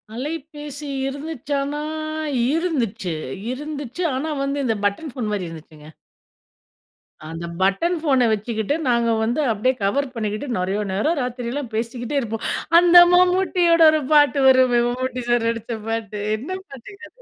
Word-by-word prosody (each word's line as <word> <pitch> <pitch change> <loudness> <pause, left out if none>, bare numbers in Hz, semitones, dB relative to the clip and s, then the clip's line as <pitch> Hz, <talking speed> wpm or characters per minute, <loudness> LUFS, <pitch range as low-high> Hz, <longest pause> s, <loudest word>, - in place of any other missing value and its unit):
அலைபேசி 295 +1 -6 0.2
இருந்துச்சான்னா 285 0 -3 0.7
இருந்துச்சு 235 - -1 0.4
இருந்துச்சு. 290 +3 -5
ஆனா 290 +5 -2
வந்து 275 +1 -2
இந்த 225 -3 +1
பட்டன் 245 +9 -1
ஃபோன் 235 -4 -4
மாரி 200 -3 -2
இருந்துச்சுங்க. 155 -2 -12 1.4
அந்த 165 +1 -6 0.2
பட்டன் 330 - +1
ஃபோனை 270 -6 +3
வச்சுக்கிட்டு, 220 +4 -2
நாங்க 235 -1 +2
வந்து 240 +7 0
அப்படியே 225 +5 +1
கவர் 280 +9 +1
பண்ணிகிட்டு, 215 +3 -3
நிறைய 190 +3 -1
நேரம் 305 - 0
ராத்திரலாம் 250 +1 -4
பேசிக்கிட்டே 240 +4 -3
இருப்போம். 225 -3 -4 0.3
அந்த 350 0 +4 0.2
மம்மூட்டியோட 360 -1 +3
ஒரு 310 0 +1
பாட்டு 290 -2 +5
வருமே, 255 -2 +5
மம்மூட்டி 255 0 -3
சார் 240 -1 +2
நடித்த 230 0 -4
பாட்டு 215 -2 -3 0.2
என்ன 265 +10 -9 0.2
பாட்டுங்க 395 - -12
அது. - - -25
255 Hz, 130 wpm, -22 LUFS, 225-295 Hz, 1.4 s, பாட்டு